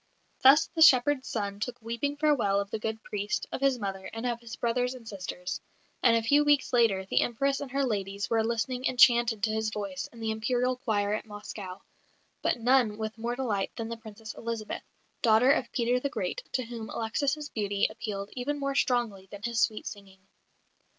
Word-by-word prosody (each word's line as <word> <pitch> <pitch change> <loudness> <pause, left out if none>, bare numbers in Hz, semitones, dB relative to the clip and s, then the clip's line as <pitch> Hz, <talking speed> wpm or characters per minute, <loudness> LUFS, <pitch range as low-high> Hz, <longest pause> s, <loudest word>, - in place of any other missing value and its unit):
Thus 280 +4 +7
the 325 - -2
shepherd's 275 -2 +6
son 200 -2 -3
took 250 +3 -4
weeping 235 +5 -3
farewell 265 -10 +2
of 200 +1 -4
the 220 - -2
good 220 +1 -4
priest, 205 0 -2
of - - -4
his 275 -2 +3
mother, 195 -3 -4
and 225 +2 -5
of 240 -1 -1
his 235 -1 -8
brothers 245 +2 0
and 235 -3 -12
sisters; 180 -3 -5 0.4
and 230 -2 +5
a 225 - -1
few 290 +6 +4
weeks 290 -3 +2
later 220 -6 +3
the - - +2
Empress 275 +4 0
and 280 - -5
her 275 +2 0
ladies 200 -3 -2
were 225 -1 +2
listening 235 +3 -1
enchanted 240 -3 +4
to 220 - +2
his 220 0 0
voice 200 -4 -4
in 235 - -14
the 220 -1 -1
Imperial 245 +3 0
choir 210 -5 0
at 215 - -3
Moscow 205 -2 -8 0.6
but - - +1
none 240 -3 +3
with 220 0 -5
more 235 +2 -2
delight 220 -7 -2
than 230 -1 -4
the 230 - -3
Princess 220 -1 -9
Elizabeth, 230 -2 -4 0.4
daughter 230 +3 +5
of 285 - +1
Peter 245 0 +1
the 280 - -2
Great, - - -3
to 255 - 0
whom 230 -2 -7
Alexis' 285 +6 -1
beauty 205 -2 0
appealed 205 -2 -5
even 285 +4 -2
more 275 0 -1
strongly 235 -8 0
than 205 +1 -10
his 235 -1 -1
sweet 215 - +1
singing. 195 -2 -9
230 Hz, 195 wpm, -29 LUFS, 210-255 Hz, 0.6 s, Thus